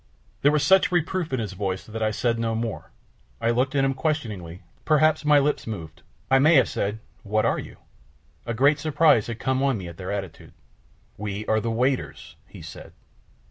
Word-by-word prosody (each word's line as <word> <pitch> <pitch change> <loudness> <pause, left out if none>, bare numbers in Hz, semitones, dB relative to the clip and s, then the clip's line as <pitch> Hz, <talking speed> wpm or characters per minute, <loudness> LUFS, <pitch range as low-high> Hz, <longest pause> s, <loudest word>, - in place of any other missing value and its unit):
There 145 - +5
was 150 -1 +1
such 190 -1 +4
reproof 175 -1 -1
in 130 - -1
his 105 -4 -4
voice 95 -1 -3
that 110 +1 -7
I 110 - +2
said 115 +2 -1
no 115 -1 -1
more, 115 -1 -4 0.5
I 115 - +1
looked 130 +4 0
at 135 - +3
him 135 - +1
questioningly, 105 - -3 0.2
perhaps 155 0 +3
my 150 0 +5
lips 145 -2 0
moved, 85 -6 -7 0.3
I 135 - +6
may 155 +4 +5
have 130 - +5
said 105 +2 -2 0.2
"What 110 +1 0
are - - +1
you?" - - -10 0.7
A 115 - -2
great 140 +5 +3
surprise 150 -7 +3
had 115 -1 -5
come 130 +2 -1
on 135 -3 +1
me 95 -3 -7
at 85 -1 -10
their 95 -1 -5
attitude. 95 -5 -6 0.6
"We 105 +1 -5
are 110 - +2
the 115 - -3
waiters," 125 +3 -2
he - - -12
said. - - -11
115 Hz, 195 wpm, -24 LUFS, 105-145 Hz, 0.7 s, I